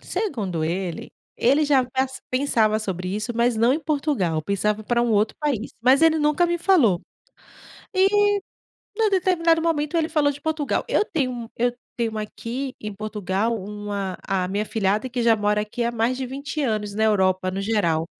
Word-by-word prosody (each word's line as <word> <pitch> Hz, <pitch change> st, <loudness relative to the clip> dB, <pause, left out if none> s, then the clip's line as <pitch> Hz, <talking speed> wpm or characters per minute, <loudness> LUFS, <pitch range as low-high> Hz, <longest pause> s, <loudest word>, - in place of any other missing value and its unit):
segundo 220 Hz, -, -2 dB
ele, 175 Hz, +1 st, -3 dB, 0.3 s
ele 280 Hz, +5 st, +3 dB
já 275 Hz, -3 st, +3 dB
pas 265 Hz, +1 st, -2 dB
pensava 230 Hz, -5 st, +2 dB
sobre 185 Hz, -4 st, -4 dB
isso, 215 Hz, +3 st, -3 dB
mas 235 Hz, 0 st, +2 dB
não 235 Hz, +3 st, +4 dB
em 300 Hz, -, +1 dB
Portugal. 275 Hz, -, 0 dB
Pensava 210 Hz, +4 st, -1 dB
para 235 Hz, +2 st, +1 dB
um 240 Hz, -, 0 dB
outro 215 Hz, 0 st, +2 dB
país, 270 Hz, -7 st, -1 dB
mas 260 Hz, +5 st, +4 dB
ele 320 Hz, -1 st, +5 dB
nunca 300 Hz, +3 st, +2 dB
me 345 Hz, 0 st, -1 dB
falou. 295 Hz, -, +3 dB, 0.9 s
E, 380 Hz, 0 st, +4 dB, 0.9 s
em 450 Hz, -, +3 dB
um 420 Hz, -, +1 dB
determinado 345 Hz, -3 st, +2 dB
momento, 320 Hz, -1 st, 0 dB
ele 325 Hz, -1 st, +1 dB
falou 300 Hz, -3 st, +2 dB
de 285 Hz, -, -12 dB
Portugal. 315 Hz, -2 st, -1 dB
Eu -, -, +2 dB
tenho 285 Hz, -10 st, -1 dB
um 235 Hz, -2 st, -6 dB
eu 245 Hz, +1 st, +1 dB, 0.2 s
tenho 230 Hz, -2 st, -2 dB
aqui 240 Hz, +5 st, -5 dB
em 210 Hz, -1 st, -6 dB
Portugal 210 Hz, +1 st, -2 dB
uma 205 Hz, -1 st, -4 dB
a 185 Hz, -2 st, 0 dB
minha 200 Hz, +2 st, -1 dB
afilhada 215 Hz, +2 st, 0 dB
que 245 Hz, -1 st, -2 dB
já 230 Hz, -1 st, +4 dB
mora 210 Hz, 0 st, +1 dB
aqui 215 Hz, +3 st, -3 dB
há 235 Hz, -, +1 dB
mais 235 Hz, +2 st, 0 dB
de 260 Hz, 0 st, -3 dB
20 280 Hz, +4 st, -5 dB
anos 215 Hz, -5 st, -1 dB
na 220 Hz, +1 st, +1 dB
Europa 185 Hz, -3 st, +2 dB
no 190 Hz, +1 st, -3 dB
geral. 195 Hz, -7 st, +1 dB
235 Hz, 185 wpm, -23 LUFS, 205-285 Hz, 0.9 s, ele